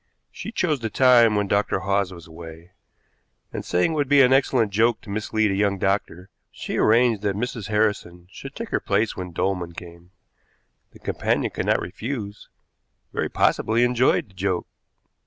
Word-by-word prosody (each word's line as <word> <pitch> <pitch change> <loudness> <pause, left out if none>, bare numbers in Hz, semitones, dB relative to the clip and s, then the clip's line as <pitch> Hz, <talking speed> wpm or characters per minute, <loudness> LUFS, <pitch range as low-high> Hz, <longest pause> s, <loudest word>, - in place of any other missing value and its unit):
She 220 - -7
chose 165 -10 0
the 115 -1 -3
time 120 -3 +5
when 105 -1 0
Dr. 100 +1 0
Hawes 100 -1 0
was 85 -3 -11
away, 80 +1 -12 0.8
and, - - -4
saying 90 - +1
it - - -2
would 145 -3 -1
be 145 -1 +6
an 130 +1 +4
excellent 130 -5 +2
joke 115 +3 +2
to 100 - -10
mislead 110 0 0
a - - -1
young 100 0 +1
doctor, 95 -1 -2 0.2
she - - -5
arranged 115 -1 +3
that 100 -2 -1
Mrs. 115 -1 -4
Harrison 105 -5 -1
should 135 +6 -10
take 230 0 -6
her - - 0
place 105 +3 0
when 90 -1 -6
Dolman 90 0 -2
came. 85 0 -12 0.8
The - - -16
companion - - -1
could - - -4
not - - +3
refuse, 105 +1 -6 0.6
very - - -2
possibly 115 +2 +2
enjoyed 125 -2 +2
the - - -22
joke. 95 -1 -2
105 Hz, 175 wpm, -23 LUFS, 95-120 Hz, 0.8 s, be